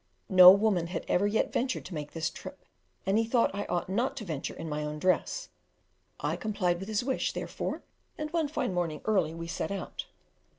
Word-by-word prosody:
No 185 -2 +10
woman 195 -4 +2
had 175 - -4
ever 200 +3 +2
yet 215 +2 0
ventured 255 +1 -1
to 185 - -8
make 150 -2 -5
this 165 0 -1
trip, - - -10 0.4
and 195 +3 +3
he - - +3
thought 230 +1 +2
that 200 - -5
I - - -2
ought 175 - 0
not 230 +8 -1
to 215 - -5
venture 155 -6 -4
in 165 - -6
my 150 -1 -2
own 150 0 -4
dress; 185 - 0 0.7
I - - -1
complied 185 -5 -1
with 195 - -6
his 220 +1 0
wish, 265 +1 -1
therefore, - - -4 0.3
and 305 0 -4
one 325 -3 +1
fine 285 -9 -2
morning 165 -4 -2
early 185 -7 +1
we 165 0 -5
set 165 - -3
out. 200 -1 -5
190 Hz, 210 wpm, -29 LUFS, 165-220 Hz, 0.7 s, No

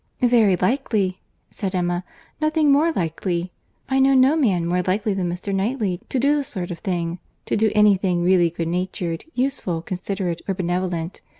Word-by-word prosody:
"Very 230 -6 +5
likely," 195 -2 0 0.3
said 195 -2 -3
Emma—"nothing 305 - -1
more 305 +4 +4
likely. 175 - -2 0.4
I 265 0 +1
know 270 0 +5
no 265 +3 +5
man 200 - +2
more 180 +1 +1
likely 200 +3 0
than 185 -2 -1
Mr. 180 +3 -4
Knightley 195 -2 -1
to - - -1
do 280 +4 +3
the 290 - 0
sort 185 -9 -4
of 170 - -6
thing—to 175 -3 -4
do 220 +1 +3
any 210 -2 +5
thing 180 -2 0
really 175 -1 +4
good 165 0 -4
natured, 175 -1 -3
useful, 245 - -1
considerate, 185 -1 -3
or 195 - -1
benevolent. 175 -1 -2
190 Hz, 165 wpm, -22 LUFS, 175-245 Hz, 0.4 s, Very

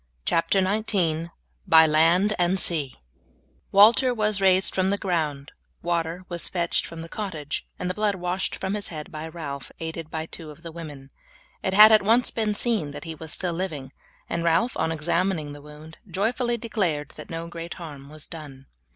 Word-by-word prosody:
CHAPTER 165 +4 +2
XIX: 185 -6 0 0.4
BY 160 0 +8
LAND 165 +6 +4
AND 180 +2 +2
SEA 150 -8 0 0.8
Walter 230 +5 +6
was 210 -2 +2
raised 190 0 +4
from 190 0 +1
the 200 - +1
ground, 155 -7 -2 0.3
water 170 +1 -1
was 175 -1 +2
fetched 170 -2 0
from 165 -1 -8
the 165 - -7
cottage, 165 -7 -4
and 180 - -3
the 180 - -1
blood 210 0 0
washed 180 +1 -2
from 190 - -3
his 210 -1 -2
head 155 -3 -7
by 155 +1 -6
Ralph, 150 -4 -7
aided 160 -1 -5
by 160 0 -4
two 165 -1 -9
of 150 +3 -13
the 165 - -7
women. 145 -5 -9 0.5
It 190 - -1
had 215 +2 +10
at 215 - +7
once 230 +5 +3
been 215 -2 -1
seen 215 -10 +1
that - - -7
he 165 -1 -6
was 160 0 -7
still 175 +1 -2
living, 155 -7 -4 0.4
and 170 - -2
Ralph 170 +9 +2
on 160 - 0
examining 165 -1 0
the 145 - -11
wound 150 +2 -13
joyfully 235 +6 0
declared 185 -11 -1
that 155 - -11
no 165 0 -5
great 170 0 -7
harm 145 -5 -9
was 155 0 -8
done. 145 -5 -10
170 Hz, 185 wpm, -25 LUFS, 155-195 Hz, 0.8 s, had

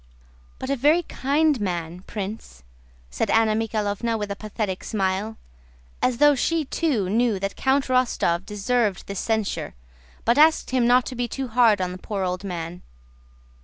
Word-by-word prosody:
"But 260 - -4
a - - +2
very 300 +7 +3
kind 290 -2 +1
man, 175 -3 -3
Prince," 200 - -7 0.5
said 65 - -1
Anna 225 -1 +3
Mikháylovna 220 0 -1
with 205 -1 -4
a - - -2
pathetic 210 -2 -4
smile, 200 +2 -2 0.6
as 250 -2 +1
though 295 +2 +6
she 315 +4 0
too 265 - 0
knew 225 +1 +1
that 195 +1 -3
Count 270 +1 +1
Rostóv 245 -9 +1
deserved 210 0 -1
this 200 -2 -5
censure, 220 - -2 0.5
but 235 +4 +3
asked 315 -3 +4
him 250 -2 +2
not 245 +1 +4
to - - -5
be 245 0 -1
too 265 +2 -4
hard 225 -3 +4
on 180 -1 -1
the 180 - -8
poor 200 0 -3
old 180 +1 -2
man. 175 -2 -5
220 Hz, 165 wpm, -24 LUFS, 195-255 Hz, 0.6 s, though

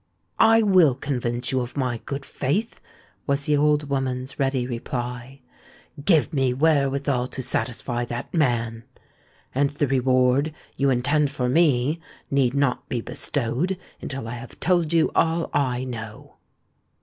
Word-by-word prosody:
"I 225 0 +6
will 180 -10 +5
convince 125 -3 -2
you 130 -1 +1
of 125 +3 -6
my 125 -4 -1
good 140 -1 -4
faith," 195 - -2 0.5
was 140 0 +1
the 150 - +3
old 150 0 +2
woman's 130 -1 -2
ready 135 -2 +1
reply. 125 +2 -5 0.6
"Give 160 0 +3
me 135 -3 +1
wherewithal 140 -3 +1
to 130 - -6
satisfy 120 -1 -2
that 120 0 -6
man; 120 -7 0 0.7
and 140 +2 +2
the 145 0 -1
reward 130 +2 +2 0.2
you 140 0 +2
intend 145 +4 +2
for 125 -3 -2
me 145 0 +2 0.3
need 135 -2 +2
not 140 -1 0
be 125 - -1
bestowed 145 +10 -1 0.2
until 135 -4 -5
I 115 - -5
have 120 +1 -11
told 175 -3 +2
you 165 -2 +3
all 165 0 +1
I 130 -3 0
know." 110 -4 -8
135 Hz, 140 wpm, -24 LUFS, 125-150 Hz, 0.7 s, I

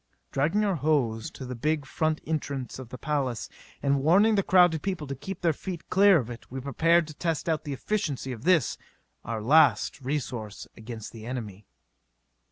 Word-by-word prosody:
Dragging 165 +10 +1
our 195 -4 +1
hose 130 -7 0
to 130 - -9
the 125 - -5
big 150 +4 -1
front 155 +3 -1
entrance 140 -5 -3
of 130 -3 -9
the 125 - -7
palace, 135 -7 -2 0.4
and 140 -1 +2
warning 195 +9 +5
the 200 - +3
crowded 175 -4 +4
people 185 -6 -3
to 140 - -4
keep 175 +7 -7
their 165 -2 +3
feet 175 +2 -7
clear 195 -1 +6
of 125 -7 -2
it, 120 - -10
we 130 - -5
prepared 165 +6 +3
to 155 - -10
test 165 +1 -2
out 160 -1 0
the 145 - -3
efficiency 145 -5 -2
of 115 -2 -7
this, 170 -2 +2 0.4
our 115 -2 -4
last 145 +2 +4
resource 125 -6 -4
against 110 -1 -8
the 115 -1 -10
enemy. 105 -6 -6
145 Hz, 180 wpm, -27 LUFS, 125-165 Hz, 0.4 s, clear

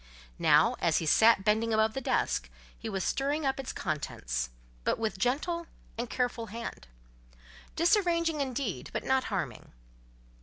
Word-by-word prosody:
Now, - - +5
as - - +2
he 165 - -1
sat 220 +5 +5
bending 220 +1 +2
above 220 0 +3
the 270 - -3
desk, - - 0 0.3
he 225 - -6
was 195 -3 -2
stirring 285 +2 0
up 270 0 0
its 265 - -4
contents; - - -3 0.3
but - - +1
with 220 -3 -2
gentle 325 - 0 0.3
and 235 +1 -4
careful 245 -2 -1
hand; 230 - -7 0.9
disarranging 335 -3 +2
indeed, 250 - -3
but - - -2
not 265 0 +2
harming. 175 - -4
235 Hz, 145 wpm, -30 LUFS, 210-280 Hz, 0.9 s, Now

